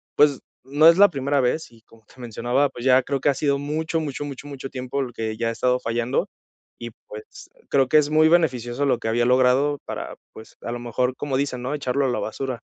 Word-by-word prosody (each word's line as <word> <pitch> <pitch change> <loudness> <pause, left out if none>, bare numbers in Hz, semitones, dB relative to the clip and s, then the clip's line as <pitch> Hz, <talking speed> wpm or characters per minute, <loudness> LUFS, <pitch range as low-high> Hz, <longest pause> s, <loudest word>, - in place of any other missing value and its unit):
pues, 145 -3 +4 0.3
no 145 +4 +4
es 170 - +7
la 205 +1 +7
primera 140 -2 0
vez 130 +6 -1
y 115 -1 -20
como 110 -1 -23
te 125 - -17
mencionaba, 120 +4 0
pues, 120 -1 -9
ya 130 0 +5
creo 140 0 -2
que 135 - -2
ha - - +3
sido 140 0 0
mucho, 160 +3 -2
mucho, 145 -2 -4
mucho, 140 0 -8
mucho 135 -2 -7
tiempo 130 0 -4
el 130 -3 -4
que 110 -1 -4
ya 115 +1 -1
he - - -1
estado 125 +2 0
fallando 120 +2 -1 0.5
y, 120 0 -7 0.2
pues, 105 0 -11
eh, - - -25
creo 135 -2 +3
que 155 - +5
es 150 -1 +3
muy 155 +1 +4
beneficioso 140 -6 +1
lo 130 - +2
que - - -5
había 120 +1 +1
logrado 130 +3 +3
para, - - -6 0.2
pues, 110 - -13
a - - -5
lo 120 - -4
mejor, 125 +2 -1
como 135 -3 -2
dicen, 135 -3 -2
¿no?, 130 +4 -3
echarlo 140 -1 -1
a - - +1
la 125 - -1
basura. 125 +1 -4
130 Hz, 240 wpm, -23 LUFS, 120-145 Hz, 0.5 s, es